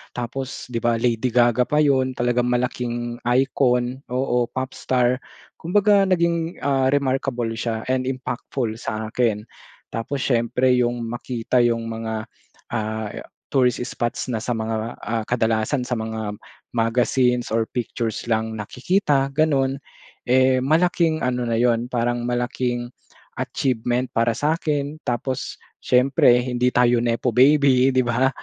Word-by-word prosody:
tapos, 125 +2 -5
di 115 - -1
ba? 120 0 +1
Lady 115 +1 0
Gaga 120 0 +3
pa 150 +1 +3
yun, 130 -3 +2
talagang 120 0 +1
malaking 120 -1 -2 0.2
icon. 125 -1 +1
Oo, 125 -2 +1
pop 130 +2 -4
star. 125 0 +1 0.4
Kumbaga 200 +3 +3
naging, 170 -2 0
ah, 135 -2 +2
remarkable 135 -3 0
siya 115 -1 -2
and 130 0 +1
impactful 130 -1 -3
sa 110 -1 -4
akin. 115 -3 0 0.5
Tapos 125 +5 -4
siyempre 125 +1 +1
yung 120 -1 0
makita 120 +1 -1
yung 115 -1 0
mga, 110 0 -4 0.5
ah, 110 -1 -2 0.4
tourist 125 -2 +2
spots 120 -1 -3
na 115 - -1
sa 125 - -2
mga, 110 +1 -3
ah, 115 0 -2
kadalasan 115 +3 0
sa 125 - -1
mga 110 -1 -4 0.4
magazines 125 +1 +2
or 115 +1 +1
pictures 115 -2 -3
lang 110 0 0
nakikita, 135 - 0
ganun. 135 -3 +1 0.5
Eh, 130 +1 +4
malaking 165 +2 +2
ano 125 -1 -1
na 115 - 0
yun, 120 0 +2
parang 120 -1 0
malaking 120 0 -2 0.5
achievement 125 -1 -1
para 115 0 +2
sakin, 150 -1 -1
tapos 130 +2 -3 0.2
siyempre 125 -1 +4
hindi 125 0 0
tayo 120 -1 +4
nepo 120 +1 0
baby, 135 0 +5
di 130 - +4
ba? 120 +2 +2
125 Hz, 130 wpm, -22 LUFS, 115-130 Hz, 0.5 s, baby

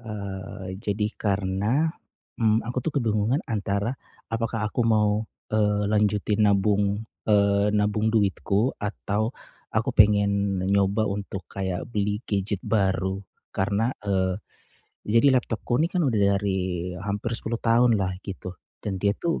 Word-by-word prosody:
Eee, 100 -4 -6
jadi 105 -1 -1
karena, 105 +9 +1 0.5
mmm, 110 0 +3
aku 120 +2 -3
tuh - - -3
kebingungan 115 +3 +1
antara 100 0 -1 0.4
apakah 115 -1 -1
aku 110 +3 -2
mau, 110 -1 +2 0.2
eee, 105 -1 +2
lanjutin 105 0 +2
nabung, 100 +1 +2 0.2
eee, 100 -1 +4
nabung 105 +1 +1
duitku 105 +2 +1
atau 105 +3 -2 0.3
aku - - 0
pengen 100 -2 +3
nyoba 100 +2 +2
untuk 100 -2 -4
kayak 95 -2 -3
beli 105 +1 -1
gadget 100 -1 -1
baru, 95 -3 +1 0.3
karena 100 +5 0
eee, 95 -1 0 0.7
jadi 115 +6 +5
laptopku 120 +2 -2
ini 165 - +3
kan 180 -1 0
udah 115 -7 +1 0.2
dari 95 -3 -2
hampir 105 +3 -3
10 115 0 -1
tahunlah 115 -6 +2
gitu, 95 -2 -7 0.3
dan 95 -2 -3
dia 100 +1 +1
tuh 170 -1 -1
105 Hz, 125 wpm, -25 LUFS, 100-110 Hz, 0.7 s, jadi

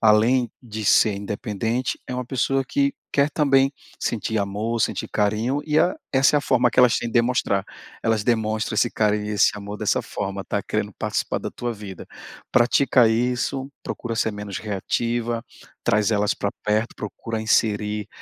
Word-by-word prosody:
além 115 +3 +4
de 110 -2 -6
ser 105 +1 +5
independente, 105 +4 -2
é 125 - -4
uma 125 0 -3
pessoa 135 +2 0
que 140 +1 +1 0.2
quer 140 +1 +4
também 135 -3 +3 0.3
sentir 110 -1 -1
amor, 105 +4 -2
sentir - - 0
carinho 110 +7 0
e 155 0 +3
a 175 - +3 0.2
essa 135 +2 +4
é - - +5
a - - -2
forma 125 -3 +3
que 120 - -5
elas 125 -2 +6
têm 120 - -2
de - - -8
demonstrar. 120 -5 +2 0.4
Elas 110 -2 +1
demonstram 110 -1 0
esse 120 +2 +2
carinho 105 -1 +1
e - - -5
esse 105 -1 +4
amor 105 0 -6
dessa - - +1
forma, - - -4
tá, - - -2
querendo - - -2
participar - - -1
da - - -5
tua 120 0 -4
vida. 100 -3 -9 0.4
Pratica 125 0 +4
isso, 125 +4 0
procura 115 -1 -4
ser 110 - +1
menos 105 -2 -5
reativa, 115 +3 -2 0.4
traz 105 +1 +2
elas 105 0 +2
pra 100 - -2
perto, 110 +2 0
procura 110 +2 -5
inserir 105 -1 +1
115 Hz, 170 wpm, -23 LUFS, 105-125 Hz, 0.4 s, elas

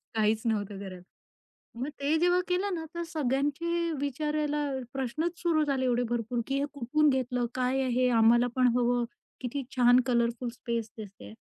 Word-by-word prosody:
काहीच 220 0 +2
नव्हतं 205 -3 -1
करत. 185 -2 -8 0.8
मग 255 +4 -3
ते 290 +3 +2
जेव्हा 355 +1 +3
केलं 370 +2 0
ना 325 -1 -4
तर 340 - -3
सगळ्यांचे 310 +4 0
विचारायला 295 +1 -1 0.3
प्रश्नच 305 +7 -2
सुरु 325 -3 +2
झाले 270 -2 0
एवढे 245 -1 +2
भरपूर 240 0 -1
की 275 0 -1
"हे 280 - 0
कुठून 295 +4 +2
घेतलं? 250 -2 0
काय 255 +1 +1
आहे? 255 0 +2
आम्हाला 235 +1 +5
पण 255 - +4
हवं! 245 0 +2 0.4
किती 265 +2 -3
छान 245 0 +6
कलरफुल 235 0 0
स्पेस 230 -2 -4
दिसतेय!" 195 - -10
255 Hz, 155 wpm, -29 LUFS, 235-295 Hz, 0.8 s, छान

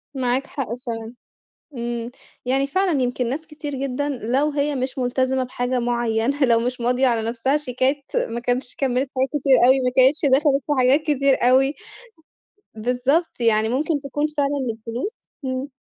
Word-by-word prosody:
معاك 260 +1 0
حق 250 -5 -4
فعلًا. 230 -2 -6 0.6
امم، 235 0 -4 0.3
يعني 270 +2 +1
فعلًا 355 -2 +1
يمكن 245 -1 -1
ناس 310 +5 -4
كتير 300 -2 -6
جدًا 275 +2 -2
لو 265 +3 0
هي 290 0 0
مش 260 +1 -3
ملتزمة 260 +1 0
بحاجة 250 0 -2
معينة 240 +3 0
لو 235 -2 +4
مش 245 +1 -3
ماضية 250 +2 +2
على 235 -2 +1
نفسها 255 +5 0
شيكات 270 0 0 0.3
ما 235 +1 -3
كانش 245 +1 -2
كمّلِت 260 0 0
حاجات 265 +1 +1
كتير 275 -3 +3
أوي 265 +1 +5
ما 250 -1 0
كانتش 270 +4 +4
دخلِت 275 0 +3
في - - -3
حاجات 260 +4 +4
كتير 275 -3 +2
أوي. 270 +2 +4 1.0
بالضبط، 250 +8 0
يعني 220 -1 +3
ممكن 290 +5 0
تكون 290 +2 -2
فعلًا 280 -2 0
الفلوس 230 - -5 0.3
إمم. 260 +2 -3
260 Hz, 160 wpm, -22 LUFS, 245-280 Hz, 1.0 s, أوي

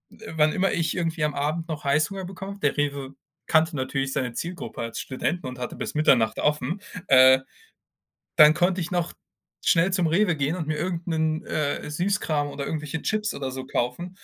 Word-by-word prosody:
äh, - - -10
wann 155 0 +4
immer 195 0 +1
ich 165 0 0
irgendwie 165 -2 -1
am 150 -1 0
Abend 155 +4 -2
noch 155 -2 -5
Heißhunger 155 +7 +1
bekommen 195 +2 -7
habe, 200 - -14
der 145 - +1
Rewe 140 -2 -2 0.3
kannte 160 +1 +3
natürlich 135 0 -1
seine 125 -3 -1
Zielgruppe 170 -2 -4
als 115 0 -4
Studenten 145 +4 -3
und 125 0 -6
hatte 125 - -5
bis - - -4
Mitternacht 120 -7 +3
offen, 150 +6 0 0.3
äh, 130 0 +7 1.0
dann 155 -1 +8
konnte 180 +1 +1
ich 170 - -3
noch 175 -2 -1 0.5
schnell 180 +3 +3
zum 180 -3 +3
Rewe 175 +1 +2
gehen 145 +5 -1
und 160 -4 -4
mir 155 -1 -2
irgend 175 -1 -3
'nen, 160 -1 0
äh, 150 -1 -2
Süßkram 155 -4 0
oder 140 -1 -5
irgendwelche 150 +1 -4
Chips 215 -1 -1
oder 135 -1 -4
so 130 0 -6
kaufen. 135 +7 -2
155 Hz, 190 wpm, -25 LUFS, 140-175 Hz, 1.0 s, dann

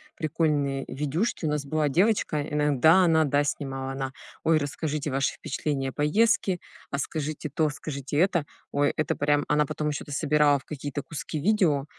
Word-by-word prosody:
прикольные 145 -4 0
видюшки. 155 - -2
У 155 - +1
нас 150 -1 -1
была 150 +1 0
девочка, 185 0 +2
э, 145 0 -3
иногда 150 +5 +5
она, 160 -1 +4
да, 145 0 +2
снимала. 135 -2 -3
Она: 135 0 -4 0.3
"Ой, 160 -1 +4
расскажите 150 +1 -3
ваши 135 +2 0
впечатления 135 -3 -3
о - - -9
поездке, 190 +3 +2 0.3
а 140 - -1
скажите 155 +1 -3
то, 155 +2 +1
скажите 140 -1 -5
это". 175 -3 +2 0.3
Ой, 145 0 +2
это 155 - 0
прям 145 0 +1
она 150 0 +3
потом 150 +2 -2
еще 145 - -3
это 145 - -11
собирала 150 -1 +3
в - - -21
какие-то 145 -1 -5
куски 155 +1 -5
видео, 155 -6 +2
150 Hz, 175 wpm, -26 LUFS, 140-155 Hz, 0.3 s, иногда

